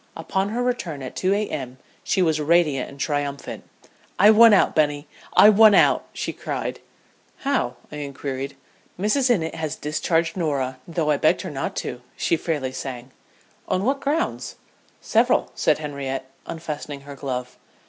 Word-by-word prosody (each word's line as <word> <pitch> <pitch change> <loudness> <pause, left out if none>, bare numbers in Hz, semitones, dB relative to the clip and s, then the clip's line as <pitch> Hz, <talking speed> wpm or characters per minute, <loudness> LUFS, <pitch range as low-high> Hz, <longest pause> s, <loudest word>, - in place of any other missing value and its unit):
Upon 190 +4 -1
her 240 +3 -1
return 175 - -2
at 130 - -7
2 190 +1 +1
A.M. 140 -11 -3 0.3
she 190 - +1
was 160 -2 +1
radiant 150 -4 +2
and 140 - -13
triumphant. 145 -1 -3 0.5
"I 205 +3 +7
won 230 +1 +8
out, 205 - +4
Bunny 145 -1 +1 0.3
I 210 - +9
won 215 0 +7
out!" - - +4
she - - -4
cried. - - -4 0.7
"How?" 275 -3 0 0.2
I 150 - -7
inquired. 140 -1 -5 0.4
"Mrs. 250 +7 +2
Innitt 165 -9 +1
has 160 -2 -3
discharged 165 +2 -1
Norah, 140 -7 -1
though 165 -3 0
I 145 - +2
begged 155 +5 +2
her 185 - -5
not 135 -2 -4
to," 125 0 -5 0.2
she - - +1
fairly 150 -5 -2
sang. 130 -1 -7 0.6
"On 185 - 0
what 275 +2 +1
grounds?" 310 +5 -1 0.5
"Several," 240 +3 +2
said 155 - +2
Henriette, 140 -3 -4 0.2
unfastening 150 -3 -6
her 140 0 -10
glove. 125 -3 -5
155 Hz, 155 wpm, -23 LUFS, 140-195 Hz, 0.7 s, I